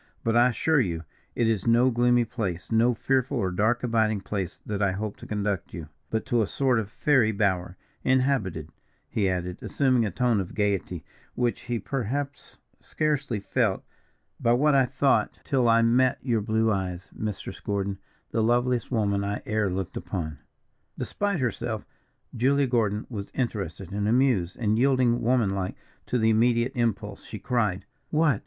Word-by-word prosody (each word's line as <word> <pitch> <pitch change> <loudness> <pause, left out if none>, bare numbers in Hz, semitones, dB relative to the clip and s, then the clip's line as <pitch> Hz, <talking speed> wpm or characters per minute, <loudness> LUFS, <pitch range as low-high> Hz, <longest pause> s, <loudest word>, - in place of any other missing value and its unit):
But, 115 0 +1
I 120 +1 +6
assure 150 +5 +2
you, 85 -9 -1 0.3
it 115 - +2
is 110 -2 0
no 120 +3 +5
gloomy 120 0 +3
place, 100 -7 -4
no 115 +2 +3
fearful 130 +3 0
or 95 -5 0
dark 110 +7 +1
abiding 110 -3 +1
place, 95 -2 -4
that 105 -1 -3
I 100 -2 +2
hope 105 +1 -4
to - - -11
conduct 100 -3 -2
you, 80 -3 -7 0.2
but 110 -1 -2
to 120 -3 +2
a 105 - +1
sort 130 -1 +1
of 105 -3 -4
fairy 125 -2 +3
bower, 95 -3 0 0.3
inhabited," 125 - +1 0.4
he 100 -3 0
added, 90 -1 -3
assuming 130 -4 +2
a 110 - 0
tone 120 +3 +1
of 95 - -5
gayety 100 -5 -1 0.3
which 120 -1 0
he 120 -1 -1
perhaps 135 +5 -4 0.2
scarcely 145 -7 -1
felt 100 - 0 0.6
"by 115 - +3
what 145 +4 +3
I 135 -2 +4
thought, 135 +2 +1
till 130 -4 +2
I 115 0 +5
met 125 +3 +3
your 115 -5 +1
blue 110 +1 +1
eyes, 95 -3 -3
Mistress 105 -2 -5
Gordon, 100 -1 -2 0.3
the 115 - +1
loveliest 120 +2 +1
woman 100 -4 +1
I 100 +1 -3
e'er 110 -2 0
looked 95 -1 -4
upon." 80 -5 -4 0.6
Despite 205 -3 -1
herself, 115 -3 -2 0.5
Julia 140 +4 +3
Gordon 110 -4 0
was 100 -5 -6
interested 100 -7 -3
and 100 +1 -1
amused, 115 -7 +2
and 110 -1 +1
yielding, 125 -2 +3
womanlike 100 -6 +1 0.3
to 125 - 0
the 110 -1 +3
immediate 120 +2 +3
impulse, 110 -5 -2
she 110 - -7
cried: 105 -6 -1 0.2
"What! 150 -8 +2
115 Hz, 165 wpm, -26 LUFS, 100-125 Hz, 0.6 s, I